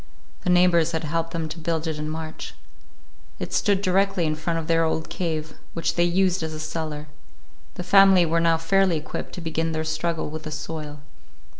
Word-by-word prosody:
The - - -1
neighbors 175 -2 +4
had 160 - -1
helped 165 +2 -1
them 165 -1 -3
to 160 +2 -7
build 160 0 -1
it 160 -2 -3
in 150 0 -3
March. 160 0 -6 0.8
It - - -5
stood 200 -2 +2
directly 195 -1 +2
in 155 - +1
front 165 +2 -2
of 165 - -3
their 165 0 +3
old 160 0 -1
cave, 160 -3 -3 0.2
which 165 - -1
they 175 - +2
used 185 +1 +2
as 160 -1 -3
a - - -6
cellar. 155 -1 -4 0.7
The 180 - -5
family 195 -1 +6
were 165 +1 +1
now 165 -1 +3
fairly 180 +1 +2
equipped 155 - -6
to 180 - -6
begin 165 0 -1
their 155 0 -1
struggle 160 0 -2
with 155 0 -5
the 155 -1 -7
soil. 150 -2 -6
165 Hz, 195 wpm, -24 LUFS, 155-175 Hz, 0.8 s, family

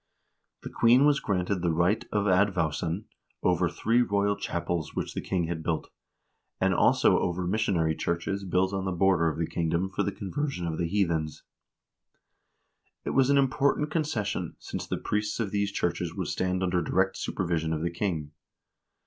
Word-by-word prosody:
The - - -7
queen 120 +4 +5
was 145 -2 +4
granted 95 0 -1
the 85 - +1
right 85 +6 +2
of 105 -1 +1
advowson 90 -1 +1 0.4
over 90 -1 +2
three 115 +8 +2
royal 100 -3 +1
chapels 85 -4 -3
which - - -3
the - - -3
king 90 -2 -1
had 80 -1 -3
built, 80 0 -2 0.7
and 95 0 +2
also - - +4
over 90 +1 -1
missionary 90 -5 +1
churches 85 +4 -2
built 95 +1 +1
on 95 -1 -2
the 95 - -1
border 90 -2 +3
of 80 - -5
the 85 - 0
kingdom 85 +3 -1
for - - -1
the 100 - 0
conversion 105 +1 -3
of 80 -1 -3
the 85 - 0
heathens.2 85 -5 -1 1.6
This - - -3
was 135 0 +4
an 140 - +4
important 140 +2 +2
concession, 105 - -2
since - - -6
the - - -2
priests 105 +1 -2
of 105 -4 -1
these 100 -1 0
churches 85 -2 -2
would - - -3
stand 95 0 -1
under 90 -1 +1
direct 95 +3 +1
supervision 85 -3 -2
of 80 0 -2
the 85 - -1
king. 85 -5 -2
95 Hz, 170 wpm, -28 LUFS, 85-100 Hz, 1.6 s, queen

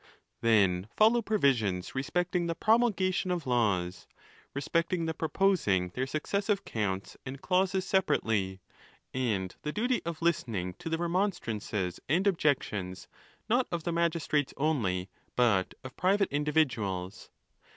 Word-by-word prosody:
Then 100 -5 +3
follow 225 +3 +5
provisions 120 - +1
respecting 175 +5 -1
the 165 - -1
promulgation 200 -5 +2
of 175 -3 -1
laws, 100 -8 0 0.5
respecting 165 +4 0
the 160 - -1
proposing 160 - +1
their 125 +8 -3
successive 200 +7 -1
counts 100 -3 -3
and 130 +1 -7
clauses 185 +3 +1
separately, 105 - +1 0.5
and 105 -8 -1
the 150 - -3
duty 245 +7 0
of 165 -1 -4
listening 115 - 0
to - - -5
the 165 - 0
remon 175 +3 0
strances 100 -5 -3
and 175 +7 +2
objections, 130 - 0 0.4
not 245 +3 +2
of 170 -2 -2
the 170 - -1
magistrates 165 -4 0
only, 110 -12 0 0.3
but 110 -7 +2
of 130 -1 -9
private 195 +2 +2
individuals. 120 - -1
150 Hz, 125 wpm, -30 LUFS, -, 0.5 s, follow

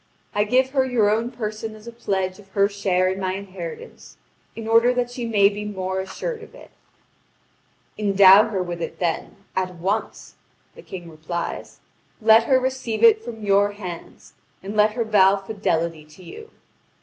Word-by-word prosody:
I 205 0 +1
give 255 +4 +2
her 265 -1 +2
your 235 -5 +2
own 225 +3 0
person 220 -2 -5
as 215 0 -15
a 235 - -8
pledge 190 -5 -3
of 200 - -16
her 200 0 +5
share 195 -3 0
in 190 +1 -2
my 185 -1 -2
inheritance, 185 -4 -9 0.4
in 225 -1 -7
order 230 +2 +4
that 245 -1 -1
she 245 -1 -5
may 205 -3 +4
be 205 +1 -3
more 190 -2 -3
assured 440 - -5
of 445 - -13
it." - - -15 1.3
"Endow 200 +1 +6
her 190 -4 -1
with 175 -1 -6
it, - - -5
then, 170 -3 -2 0.2
at 185 -1 -2
once," 195 +6 -4 0.4
the 480 - -13
King 180 - -9
replies; 165 +2 -6 0.4
"let 220 0 +5
her 260 +1 +4
receive 260 -3 -3
it 445 -1 +6
from 225 -2 -8
your 205 0 +3
hands, 180 -5 -9 0.3
and 200 +2 -6
let 210 0 +4
her 235 0 -1
vow 200 -3 +5
fidelity 170 -6 -2
to 155 +4 -17
you! 440 - -11
205 Hz, 175 wpm, -22 LUFS, 190-230 Hz, 1.3 s, Endow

